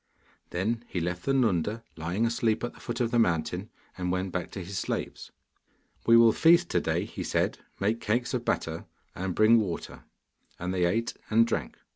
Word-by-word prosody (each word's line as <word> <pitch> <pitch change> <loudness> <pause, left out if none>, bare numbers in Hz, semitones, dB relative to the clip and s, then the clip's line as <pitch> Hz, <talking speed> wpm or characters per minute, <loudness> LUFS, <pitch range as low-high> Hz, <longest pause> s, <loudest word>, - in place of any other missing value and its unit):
Then 115 +6 -1
he 90 - -3
left 90 +1 -3
the 135 - +2
Nunda 110 -3 +1
lying 85 +7 -1
asleep 115 -1 0
at 120 - -3
the - - -17
foot 120 -1 -5
of 120 -1 0
the 120 - +3
mountain, 90 +1 0 0.3
and 90 -1 -2
went 95 +1 -1
back 90 0 -3
to 95 - -5
his 95 +1 -4
slaves. - - -4 0.8
'We 115 0 +8
will 115 -1 +7
feast 170 +6 +5
to - - +1
day,' - - 0
he - - -6
said; - - 0 0.2
'make 110 +4 0
cakes 120 +5 0
of 125 -2 -1
batter, 80 -7 -2 0.3
and 95 -1 -3
bring 110 +2 +6
water,' 95 -6 -4 0.5
and 90 +1 -3
they 90 -1 +2
ate 115 +7 0 0.2
and 115 +1 +5
drank. 70 - -3
105 Hz, 190 wpm, -28 LUFS, 90-115 Hz, 0.8 s, We